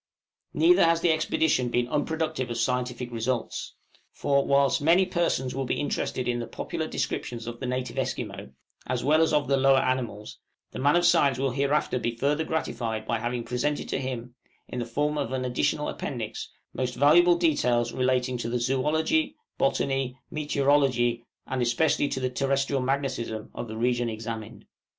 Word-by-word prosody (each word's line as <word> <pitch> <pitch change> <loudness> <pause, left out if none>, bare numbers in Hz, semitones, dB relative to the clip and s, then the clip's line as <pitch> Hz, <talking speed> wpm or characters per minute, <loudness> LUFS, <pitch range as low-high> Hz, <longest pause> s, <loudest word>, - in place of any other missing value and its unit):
Neither 355 +2 +5
has 165 0 +3
the 170 - +4
expedition 155 -4 +1
been 120 0 0
unproductive 155 -1 -1
of 120 - -3
scientific 125 +1 -1
results. 115 +1 -3 0.4
For, 140 -1 +1
whilst 140 +1 +3
many 170 +5 +5
persons 170 -8 0
will 135 0 -2
be - - -1
interested 130 -3 -2
in 120 -1 0
the 120 - -4
popular - - -4
descriptions 115 -2 -3
of 120 0 -6
the 130 - -4
native 125 -1 -3
Esquimaux, - - -4 0.4
as 125 -1 -1
well 155 +3 +4
as 160 - +3
of 150 -2 +2
the 140 - +3
lower 135 0 +5
animals, 120 -6 -2 0.3
the - - -7
man 145 +4 +3
of 175 0 +3
science 140 -6 +4
will 135 0 0
hereafter 140 -1 0
be 120 0 -2
further 145 +6 +1
gratified 115 -8 -3
by 115 0 -1
having 120 +1 -2
presented 125 +5 -2
to - - -1
him, 125 -2 -5 0.3
in 125 - -5
the 120 - -3
form 150 +5 -1
of 140 -4 -2
an 130 -1 -1
additional 125 +4 0
Appendix, 115 -5 -5 0.2
most 125 -1 -2
valuable 170 +5 +5
details 125 -8 +1
relating 130 -1 0
to 115 - -3
the 125 +1 -1
zoology, 150 +6 +1 0.2
botany, 135 -1 0
meteorology, 135 -5 +2 0.2
and 130 -1 -2
especially 120 +5 +2
to 130 - -2
the 130 -1 -1
terrestrial 135 +1 0
magnetism, 130 -5 -2
of 120 - -5
the 110 0 -7
region 120 0 +1
examined. 110 -1 -6
130 Hz, 170 wpm, -27 LUFS, 120-145 Hz, 0.4 s, Neither